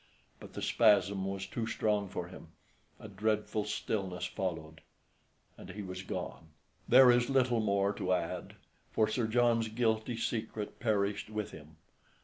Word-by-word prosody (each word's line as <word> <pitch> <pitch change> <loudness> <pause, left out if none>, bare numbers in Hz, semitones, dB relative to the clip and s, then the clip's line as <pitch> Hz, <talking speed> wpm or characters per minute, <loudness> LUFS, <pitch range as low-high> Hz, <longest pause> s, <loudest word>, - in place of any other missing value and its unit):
But - - -12
the - - -5
spasm 100 -3 +3
was 95 0 -3
too 115 -2 -4
strong 105 -3 0
for 90 -1 -5
him; 90 -2 -11 0.5
a - - -9
dreadful 105 -1 -1
stillness 100 -3 -2
followed, 80 -4 -4 0.8
and - - -10
he 100 +3 -6
was 95 -1 -6
gone. 85 -3 -6 0.4
There 125 0 +9
is 120 +1 +2
little 130 -3 +3
more 100 -1 +1
to 95 -2 -1
add; 85 -2 -3 0.4
for 110 - +2
Sir 110 +1 0
John's 115 0 +3
guilty 110 +1 0
secret, 110 -2 -3
perished 105 -3 0
with 105 -1 -4
him. 80 0 -12
105 Hz, 145 wpm, -32 LUFS, 95-115 Hz, 0.8 s, There